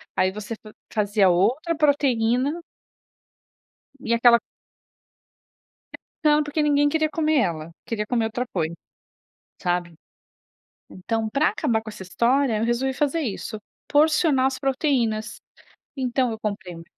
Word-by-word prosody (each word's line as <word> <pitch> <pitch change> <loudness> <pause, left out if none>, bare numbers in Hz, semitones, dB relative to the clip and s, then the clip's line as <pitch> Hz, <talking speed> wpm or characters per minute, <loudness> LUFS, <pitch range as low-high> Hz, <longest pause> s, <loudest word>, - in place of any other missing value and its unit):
Aí 185 0 +2
você 210 +2 -6
faz 215 -1 -13 0.2
fazia 205 -2 +3
outra 255 - +1
proteína 280 0 +1 1.4
e 235 -4 -2
aquela 235 0 +6 1.6
Ia - - -59 0.2
ficando, 300 0 +4
porque 295 +1 -1
ninguém 290 -1 +3
queria 315 +1 +1
comer 310 0 +1
ela, 165 -5 -2
queria 210 -2 -3
comer 230 -2 0
outra 240 +3 -3
coisa, 165 -2 -1 0.9
sabe. 175 -2 -1 1.0
Então, 220 +4 -3
pra 285 +6 +2
acabar 230 -7 0
com 220 - -9
essa 205 -3 -9
história, 235 +5 +1
eu 215 - -1
resolvi 250 +3 0
fazer 295 +4 0
isso, 220 -4 -4 0.3
porcionar 305 -2 +3
as 265 0 -1
proteínas. 255 -6 0 0.6
Então, 255 -1 0
eu 220 - -5
comprei 200 -4 -4
uma 165 0 -11
240 Hz, 130 wpm, -24 LUFS, 210-285 Hz, 1.6 s, aquela